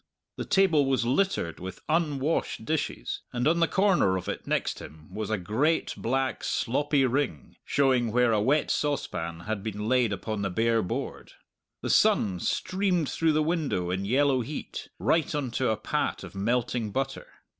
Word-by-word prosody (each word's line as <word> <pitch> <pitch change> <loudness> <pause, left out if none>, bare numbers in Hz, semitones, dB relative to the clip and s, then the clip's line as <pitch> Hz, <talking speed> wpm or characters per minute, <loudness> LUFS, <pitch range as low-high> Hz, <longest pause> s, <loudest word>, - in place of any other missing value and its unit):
The - - -3
table 170 -8 +3
was 130 -3 +1
littered 130 - 0
with 95 0 -7
unwashed 155 -6 0
dishes, 150 - -2
and 125 +2 0
on 170 +2 +3
the 165 - +4
corner 190 - +3
of 90 - -6
it - - -4
next - - -1
him 80 +3 -12
was 110 +1 -4
a 110 - +1
great 115 - 0
black 130 +2 -1
sloppy 145 +3 +1
ring, 125 - -2
showing 130 -5 +2
where 125 0 +3
a 105 -2 +2
wet 140 +8 +2
saucepan 85 - -2
had 105 +2 -3
been 105 0 -4
laid 125 -2 +3
upon 100 +2 -3
the 100 - -1
bare 115 +4 +2
board. 90 - -5 0.5
The - - 0
sun 95 -3 +3
streamed 185 - 0
through 160 -1 +2
the 155 0 +2
window 150 - -1
in 95 +2 -1
yellow 130 +3 +3
heat 140 +6 -6
right 160 -1 +1
on 140 -4 -2
to 125 0 0
a 110 - +1
pat - - -2
of - - -9
melting 115 +2 0
butter. 135 +5 -3
125 Hz, 170 wpm, -27 LUFS, 105-150 Hz, 0.5 s, the